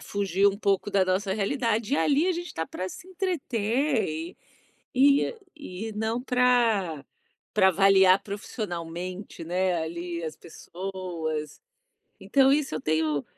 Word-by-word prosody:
fugir 200 -1 0
um 200 - -2
pouco 200 -1 0
da 195 -1 +3
nossa 190 +1 0
realidade. 225 +3 0
E - - +2
ali 295 +4 +3
a 370 - +2
gente 350 0 -5
tá 160 - -2
pra 185 +1 -5
se 315 - -11
entreter 240 - -1 0.6
e 280 - +4 0.2
e 220 -6 -7
não 220 +3 -1
pra 235 - +2 0.5
pra 190 -2 +5
avaliar 190 0 +5
profissionalmente, 180 -3 -6
né, 180 +2 0
ali 170 +1 -5
as 155 -1 -5
pessoas. 170 -3 -6 0.6
Então 270 -1 +3
isso 285 - +1
eu - - -4
tenho 155 -2 0
195 Hz, 130 wpm, -26 LUFS, 175-245 Hz, 0.6 s, pra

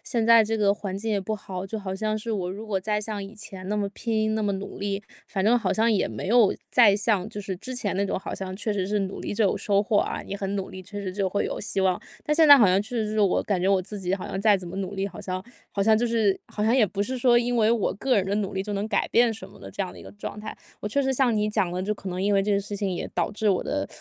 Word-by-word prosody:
现 230 -4 -1
在 230 -1 +7
这 220 +1 -1
个 205 -2 +3
环 200 -2 -5
境 220 +3 -3
也 205 -2 +1
不 215 +3 -3
好， 190 -1 -6
就 220 +3 -4
好 190 -2 -4
像 215 +2 -1
是 225 +1 -4
我 185 -4 -2
如 210 +4 -7
果 195 -3 -1
再 210 +1 0
像 210 -1 -4
以 195 +2 -9
前 195 -3 -9
那 210 - 0
么 205 -1 0
拼、 220 0 -1
那 220 - -1
么 205 - +1
努 195 +1 -7
力， 200 0 -2 0.2
反 190 -2 -2
正 235 +3 +5
好 235 - -1
像 225 +1 +2
也 205 - +1
没 - - -5
有 230 -2 +5 0.2
再 215 -5 +6
像 205 -2 0
就 210 -2 -6
是 190 -1 -4
之 255 +7 -6
前 210 -5 -2
那 200 +1 +1
种 - - -1
好 195 - -6
像 185 -1 -5
确 215 +1 -2
实 190 -2 -1
是 210 +1 0
努 195 0 -4
力 - - -4
就 220 +1 +2
有 195 - +2
收 200 -1 +2
获 210 -1 +2
啊， - - -1
你 - - -6
很 200 0 -3
努 195 - -4
力， 185 - -8
确 205 +3 -8
实 185 -2 -4
就 195 -1 0
会 200 +2 -1
有 - - -3
希 200 -2 -1
望。 185 -1 +2 0.2
但 300 - +1
现 315 -1 +5
在 285 - +12
好 230 - +6
像 185 +1 +4
确 240 +4 -5
实 215 -2 -1
是 215 0 0
我 200 -3 +3
感 195 -4 -1
觉 185 - +1
我 195 -2 +3
自 205 +2 -6
己 185 0 0
好 190 - -6
像 190 - -4
再 210 -1 +5
怎 185 - -7
么 175 - -7
努 195 0 -3
力， 195 0 -1
好 205 - -8
像 185 -1 -4 0.3
好 200 - -1
像 220 +2 +5
就 240 +2 +1
是 220 -4 +2
好 210 - -3
像 225 +3 +3
也 230 -5 +5
不 200 +2 -2
是 255 +4 -3
说 240 -1 +5
因 245 +1 0
为 220 -1 +4
我 230 -3 +1
个 255 +6 +1
人 195 - +2
的 195 - -1
努 205 -1 -2
力 190 - -1
就 210 - -5
能 200 +2 -2
改 200 - +1
变 235 -1 +4
什 205 -3 -8
么 - - -16
的 - - -9
这 - - -3
样 185 - -5
的 - - -13
一 - - -11
个 - - -11
状 205 0 -7
态。 215 +1 -7 0.2
我 210 - -3
确 280 +7 +1
实 265 0 +1
像 250 -4 +2
你 210 0 +1
讲 205 -4 +1
的， 180 +1 -3
就 210 +3 0
可 200 -2 -7
能 180 +1 -3
因 205 +1 +2
为 195 -1 +3
这 210 - -1
个 200 - +3
事 200 +1 -5
情 200 -1 -1
也 - - -3
导 - - 0
致 210 0 +1
我 185 - +1
的 95 0 -2
205 Hz, 350 characters per minute, -25 LUFS, 195-220 Hz, 0.3 s, 在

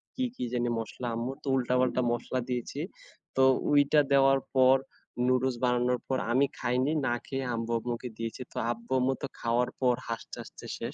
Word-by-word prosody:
কী, 255 - 0
কী - - -4
জানি 120 -1 +1
মসলা 120 +2 -5
আম্মুর, 120 +4 -3
তো - - -9
উল্টা-পাল্টা 125 0 +2
মশলা 120 +2 -2
দিয়েছি। 125 +2 -3 0.6
তো 135 - +6 0.3
ঐটা 145 +1 +5
দেওয়ার 135 0 +5 0.2
পর 130 0 +6 0.5
নুডলস 130 0 +2
বানানোর 125 0 +2
পর 130 - +2
আমি 130 +4 +4
খাইনি, 125 +4 +1 0.2
না 120 - +2
খেয়ে 135 -1 -3
আব্বু-আম্মুকে 115 +1 -2
দিয়েছি। 115 +2 -5
তো - - -9
আব্বু-আম্মু 125 +3 0
তো - - 0
খাওয়ার 120 +1 +1
পর 125 -1 +4
হাসতে, 115 -1 -5
হাসতে - - -12
শেষ। - - -5
125 Hz, 165 wpm, -29 LUFS, 120-130 Hz, 0.6 s, তো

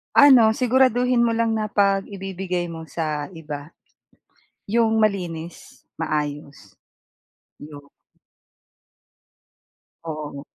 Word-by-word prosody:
Ano, 250 -6 +7
siguraduhin 250 0 +2
mo 230 - +1
lang 225 -1 0
na 215 - -1
'pag 195 -2 +1
ibibigay 190 -3 -4
mo 165 -1 -8
sa 155 -3 -3
iba, 150 -2 -8 0.9
'yong 225 +1 +1
malinis, 175 -6 -3 0.2
maayos, 150 -2 -4 0.8
'yong 145 -1 -11 2.2
Oo. 150 -3 -6
185 Hz, 85 wpm, -22 LUFS, 155-225 Hz, 2.2 s, Ano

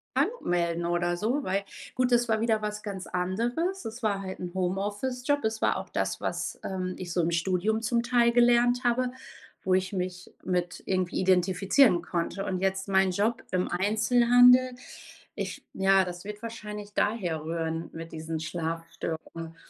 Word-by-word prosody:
krank - - +3
melden 170 -1 0
oder 175 0 0
so, 235 +10 0
weil 195 +2 0 0.3
gut, 255 0 +1
das 240 0 +4
war 220 -1 +2
wieder 225 -2 +2
was 210 0 -4
ganz 195 -3 -6
anderes. 240 - -1
Es 225 +2 -7
war 200 -2 +1
halt 190 -1 -6
'n 175 -1 -6
Homeoffice-Job, 205 +9 -1
es 220 0 -1
war - - +2
auch - - -6
das, - - -1
was, - - -3
ähm, 185 -1 -3
ich 175 -2 -5
so 175 - +2
im 165 +1 0
Studium 185 +6 +1
zum 235 +1 +1
Teil 235 -1 +3
gelernt 245 +1 +4
habe, 245 +1 +1 0.5
wo 185 - +1
ich 185 +1 +1
mich 180 -1 -4
mit 180 -1 -2
irgendwie 185 -2 0
identifizieren 185 +3 +4
konnte. 175 +3 -2
Und 185 -2 -2
jetzt 190 +1 -1
meinen 190 -1 +3
Job 210 +5 0
im 185 0 0
Einzelhandel, 245 +6 +5 0.6
ich - - -5
ja, 195 0 +4
das 175 +1 -7
wird 210 0 -7
wahrscheinlich 210 -2 -7
daher 185 -9 0
rühren 165 0 -3
mit 165 0 -8
diesen 160 0 -4
Schlafstörungen. 165 0 -5
195 Hz, 165 wpm, -28 LUFS, 175-230 Hz, 0.6 s, Einzelhandel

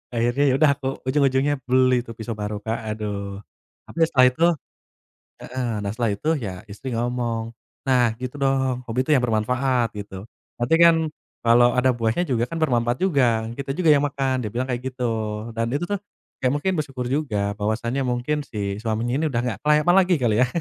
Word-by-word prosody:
Akhirnya 120 +4 +1
ya - - +2
udah, 155 -1 +6
aku 135 -1 -5 0.2
ujung-ujungnya 135 +1 +2
beli 130 -1 +3
tuh, 115 - -10
pisau 115 0 -6
baru, 105 0 -4
Kak, 110 +2 -3
aduh. 100 -2 -4 0.5
Tapi - - -13
ya, - - +4
setelah 130 -1 +6
itu 160 +6 -2 1.0
heeh. 125 -1 -3 0.2
Nah, - - -1
setelah 115 -1 0
itu, 150 - -6
ya 95 -4 -4
istri 105 +5 -8
ngomong, 120 -1 -2 0.3
"Nah, 120 -4 +2
gitu 130 +3 -6
dong. 135 -2 +1
Hobi 130 +3 0
tuh 155 - +3
yang 130 - +4
bermanfaat," 125 +2 0
gitu. 100 -1 -8 0.3
"Nanti 120 +7 +2
kan 170 -1 +8 0.4
kalau 120 +1 +5
ada 125 +1 +2
buahnya 120 +9 0
juga, 120 -3 +1
kan 165 - -3
bermanfaat 120 -5 +1
juga. 125 -11 +2
Kita 140 -1 -4
juga 165 +1 +1
yang 145 -1 +5
makan," 135 -3 -1
dia 105 - -4
bilang 130 +2 -1
kayak 125 -1 -2
gitu. 125 -1 -3 0.5
Dan 115 +1 -1
itu 145 +6 -1
tuh, 205 - -1 0.5
ya - - +4
mungkin 180 +6 0
bersyukur 135 -5 -3
juga, 110 -8 -1
bahwasanya 115 +5 -1
mungkin 125 +4 -1
si 100 -5 -4
suaminya 115 +2 -1
ini 160 - +1
udah 120 -1 0
nggak 110 -5 -3
kelayapan 150 +4 +4
lagi, 185 -1 +4
kali 115 -4 +2
ya. - - +1
125 Hz, 190 wpm, -23 LUFS, 115-140 Hz, 1.0 s, kan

